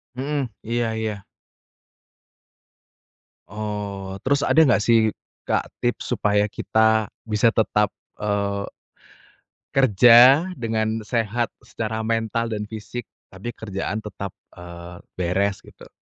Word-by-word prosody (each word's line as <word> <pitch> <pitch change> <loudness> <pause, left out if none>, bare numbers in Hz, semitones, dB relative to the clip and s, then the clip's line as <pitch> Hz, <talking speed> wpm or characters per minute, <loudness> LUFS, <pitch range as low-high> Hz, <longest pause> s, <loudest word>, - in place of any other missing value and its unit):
Mhm, 140 0 -2 0.2
iya 115 0 -1
iya. 110 -3 -3 2.2
Oh, 100 -2 -5
terus 140 +1 +2
ada - - +1
nggak, 120 -6 +3
sih, 110 -2 +4 0.3
Kak, - - 0
tips 120 0 -2
supaya 105 0 +2
kita 110 -1 +2 0.2
bisa 105 0 +2
tetap, 105 -1 +2 0.3
eee 100 -1 -1 1.0
kerja 125 - +7
dengan 110 -2 -1
sehat 115 +1 -1
secara 110 -1 -4
mental 115 +1 -1
dan 105 -1 -3
fisik 110 +2 -7 0.2
tapi 100 +6 -7
kerjaan 105 0 -4
tetap, 100 -2 -7 0.2
eee, 85 0 -10 0.2
beres, 95 +3 0
gitu? - - -16
110 Hz, 105 wpm, -23 LUFS, 100-115 Hz, 2.2 s, kerja